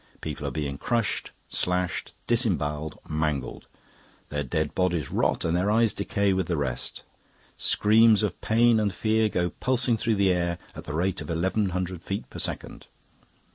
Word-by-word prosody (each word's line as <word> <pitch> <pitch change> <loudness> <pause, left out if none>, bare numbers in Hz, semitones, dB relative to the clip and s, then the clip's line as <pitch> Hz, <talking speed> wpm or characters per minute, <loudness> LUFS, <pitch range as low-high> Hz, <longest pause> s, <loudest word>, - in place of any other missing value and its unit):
People - - -5
are - - -2
being 70 -3 -3
crushed, 115 -4 -1 0.2
slashed, 90 -2 -1
disembowelled, 80 - +1
mangled; 75 -4 -2 0.6
their 75 0 -2
dead 75 +3 -1
bodies 90 -6 0
rot - - +1
and 85 0 +1
their 90 +3 +1
eyes 110 0 +4
decay 100 -2 0
with 95 -2 0
the 85 - 0
rest. 65 -4 -3 0.5
Screams 110 0 +4
of 100 -4 -2
pain 115 0 +4
and 105 -2 +1
fear 110 +3 +1
go 90 -3 0
pulsing 125 -2 +1
through 110 0 +1
the 100 -2 +3
air 85 -1 -1 0.2
at - - -8
the 75 - -4
rate 95 +3 0
of - - -7
eleven 95 +5 0
hundred 90 -1 -3
feet 100 +3 -4
per - - -7
second. - - -4
90 Hz, 165 wpm, -26 LUFS, 80-110 Hz, 0.6 s, eyes